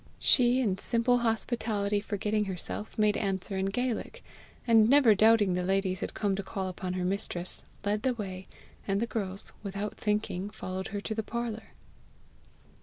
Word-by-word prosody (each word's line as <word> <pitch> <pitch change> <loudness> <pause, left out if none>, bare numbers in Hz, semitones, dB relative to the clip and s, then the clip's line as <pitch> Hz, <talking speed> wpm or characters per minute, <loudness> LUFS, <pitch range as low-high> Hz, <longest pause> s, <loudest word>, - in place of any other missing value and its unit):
She, 250 0 +5
in 195 -6 0
simple 245 +1 +2
hospitality 220 -3 0
forgetting 210 0 -1
herself, 195 +2 -5
made 210 -1 +3
answer 195 -1 -1
in 190 0 0
Gaelic; 245 +3 -2 0.4
and, 225 -2 +6
never 270 -5 +7
doubting 215 -2 +5
the 180 - 0
ladies 190 0 0
had - - -5
come 200 -2 0
to - - -1
call 190 -1 -4
upon 180 0 -4
her 185 -1 -2
mistress, 180 -2 -3 0.2
led 205 +1 +1
the 255 0 +1
way, 190 -4 -6 0.4
and 195 0 +1
the 230 - +1
girls, 200 -4 -3
without 200 +1 -4
thinking, 210 -2 -1
followed 190 -2 -5
her 205 0 -4
to 220 - -3
the 220 - -1
parlour. 225 0 -5
205 Hz, 165 wpm, -29 LUFS, 190-225 Hz, 0.4 s, never